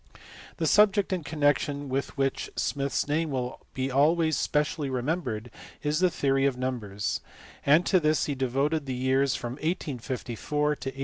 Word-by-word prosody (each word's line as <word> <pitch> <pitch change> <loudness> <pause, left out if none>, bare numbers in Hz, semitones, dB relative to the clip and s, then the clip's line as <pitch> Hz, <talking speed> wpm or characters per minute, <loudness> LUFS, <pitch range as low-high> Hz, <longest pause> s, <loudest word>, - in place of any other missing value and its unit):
The - - -1
subject 205 -2 +4
in 180 -3 -2
connection 145 -1 0
with 135 +1 -3
which 135 -1 0
Smith 140 -1 -1
s - - 0
name 155 +2 0
will 125 -2 -3 0.2
be 130 0 -1
always 160 +4 +3
specially 150 +1 0
remembered 125 -4 -2 0.3
is 150 +1 +1
the 185 0 +4
theory 135 -4 +2
of 130 -2 -1
numbers, 110 -6 -2 0.5
and 155 +5 +6
to 185 - +4
this 155 -1 +2
he 145 - -1
devoted 140 +3 0
the 130 - -2
years 130 +1 +2
from 120 - -4
1854 150 -6 -3 0.7
to 135 - -4
1864. 135 - -11
140 Hz, 165 wpm, -27 LUFS, 130-155 Hz, 0.7 s, and